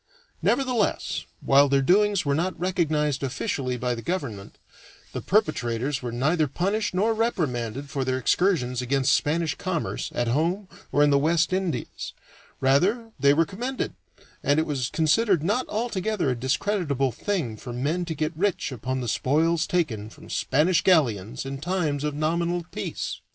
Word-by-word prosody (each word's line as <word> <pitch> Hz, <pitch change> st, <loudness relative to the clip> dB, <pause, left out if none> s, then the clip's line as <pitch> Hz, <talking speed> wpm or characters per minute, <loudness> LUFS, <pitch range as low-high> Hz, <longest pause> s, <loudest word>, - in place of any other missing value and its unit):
Nevertheless, 250 Hz, -6 st, 0 dB, 0.2 s
while 140 Hz, +1 st, +5 dB
their 135 Hz, 0 st, +3 dB
doings 200 Hz, +2 st, +3 dB
were 140 Hz, -, +2 dB
not 175 Hz, +4 st, -1 dB
recognized 155 Hz, -6 st, 0 dB
officially 130 Hz, -1 st, -2 dB
by 125 Hz, 0 st, -1 dB
the 115 Hz, -, -5 dB
government, 120 Hz, -, -4 dB, 0.6 s
the -, -, -3 dB
perpetrators 140 Hz, -, 0 dB
were 120 Hz, -2 st, -4 dB
neither 150 Hz, +6 st, +1 dB
punished 195 Hz, +8 st, -1 dB
nor 215 Hz, +5 st, +2 dB
reprimanded 140 Hz, -, -1 dB
for 140 Hz, -1 st, -2 dB
their 130 Hz, 0 st, 0 dB
excursions 130 Hz, -3 st, +1 dB
against 135 Hz, +2 st, +2 dB
Spanish 160 Hz, 0 st, +1 dB
commerce 175 Hz, -1 st, -3 dB
at 120 Hz, -, 0 dB
home 170 Hz, -, 0 dB, 0.2 s
or 145 Hz, -, +4 dB
in 145 Hz, -, +4 dB
the 140 Hz, -, +4 dB
West 160 Hz, +4 st, +2 dB
Indies; 185 Hz, -10 st, -3 dB, 0.5 s
rather 140 Hz, -, +4 dB
were 230 Hz, -2 st, -14 dB
they 140 Hz, +4 st, +4 dB
commended, 245 Hz, +8 st, -4 dB, 0.5 s
and 145 Hz, +2 st, +2 dB
it 160 Hz, -, +1 dB
was 130 Hz, -5 st, -2 dB
considered 175 Hz, +2 st, +2 dB
not 210 Hz, +9 st, 0 dB
altogether 210 Hz, -, -1 dB
a -, -, -1 dB
discreditable 135 Hz, -, 0 dB
thing 165 Hz, -, -2 dB
for 120 Hz, +3 st, -8 dB
men 145 Hz, +9 st, -1 dB
to 165 Hz, -2 st, -4 dB
get 155 Hz, +2 st, -1 dB
rich 185 Hz, -3 st, 0 dB
upon 130 Hz, +1 st, -3 dB
the 120 Hz, -, -4 dB
spoils 155 Hz, +8 st, +1 dB
taken 125 Hz, -12 st, -1 dB
from -, -, -13 dB
Spanish 155 Hz, +6 st, +2 dB
galleons 120 Hz, -, +2 dB
in 135 Hz, 0 st, -5 dB
times 155 Hz, -3 st, -1 dB
of 150 Hz, -1 st, -1 dB
nominal 170 Hz, +3 st, 0 dB
peace. -, -, -4 dB
155 Hz, 155 wpm, -25 LUFS, 130-185 Hz, 0.6 s, while